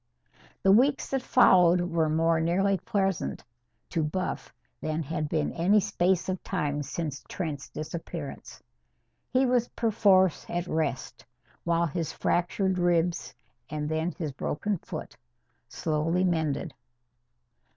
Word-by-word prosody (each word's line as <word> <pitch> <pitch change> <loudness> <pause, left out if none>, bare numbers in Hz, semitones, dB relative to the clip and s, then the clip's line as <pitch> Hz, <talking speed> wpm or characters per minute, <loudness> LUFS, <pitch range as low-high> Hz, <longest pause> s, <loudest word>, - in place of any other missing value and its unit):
The 195 - +5
weeks 265 +7 +3
that 270 -1 0
followed 180 -7 +5
were 165 -3 0
more 165 +1 +2
nearly 190 +4 +2
pleasant 195 -1 -1 0.5
to 165 - 0
Buff 180 +5 -3 0.3
than 155 +1 -2
had 155 0 -3
been 155 -2 0
any 185 +6 +4
space 185 -2 +1
of 185 -1 -2
time 145 0 -1
since 145 0 -4
Trent's 150 -6 -4
disappearance. 160 -1 -7 0.7
He 255 +1 +3
was 245 -2 +2
perforce 200 -6 +3
at 175 0 -2
rest, 155 -7 -2 0.4
while 170 0 +2
his 165 +1 -3
fractured 185 +2 0
ribs 175 -3 +1 0.3
and 150 0 -3
then 160 +2 -1
his 160 -5 -4
broken 175 +8 -2
foot - - -7 0.5
slowly 165 +3 0
mended. 160 -2 0
170 Hz, 120 wpm, -28 LUFS, 155-190 Hz, 0.7 s, The